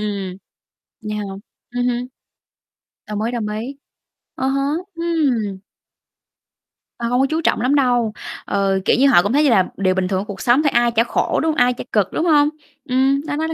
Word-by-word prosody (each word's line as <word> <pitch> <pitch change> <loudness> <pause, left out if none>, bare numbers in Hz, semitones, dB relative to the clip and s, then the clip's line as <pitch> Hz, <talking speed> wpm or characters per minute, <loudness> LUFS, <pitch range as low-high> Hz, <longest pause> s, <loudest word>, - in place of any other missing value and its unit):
ừm. 200 -3 -4 0.7
Vậy 210 - -3
hả? 210 - -3 0.5
Ưm 245 0 -1
hưm. 245 0 -1 1.0
Đồng 210 0 -3
ý, 230 +2 -1
đồng 235 -3 -3
ý. 255 +5 -6 0.6
Ờ 260 - -1
hở, 275 +1 0 0.3
ừm. 285 - 0 1.4
Ta 235 - -3
hông 245 +2 +1
có - - +4
chú 320 +1 0
trọng 265 - +1
lắm 255 +4 +2
đâu, 245 -5 +2 0.3
ừ, 195 -1 +1
kiểu - - +4
như, 275 - +5
họ 225 -10 +6
cũng 205 +5 -1
thấy 295 - +4
như 290 - +4
là 190 -6 +4
điều 185 -1 +1
bình 190 -1 0
thường 190 0 0
của 200 - -4
cuộc 200 -2 -7
sống 250 +5 +3
thôi, 290 - +3
ai 240 0 +3
chả 230 0 +3
khổ, 235 - 0
đúng 320 - +1
hông? - - -4
Ai 250 -2 +4
chả - - -7
cực, 205 -3 +1
đúng 325 - 0
hông? 295 -3 +4 0.4
Ừm, 265 +2 +2
nó 300 -2 -3
nó 315 +2 -1
nó 325 - -3
245 Hz, 215 wpm, -20 LUFS, 210-275 Hz, 1.4 s, họ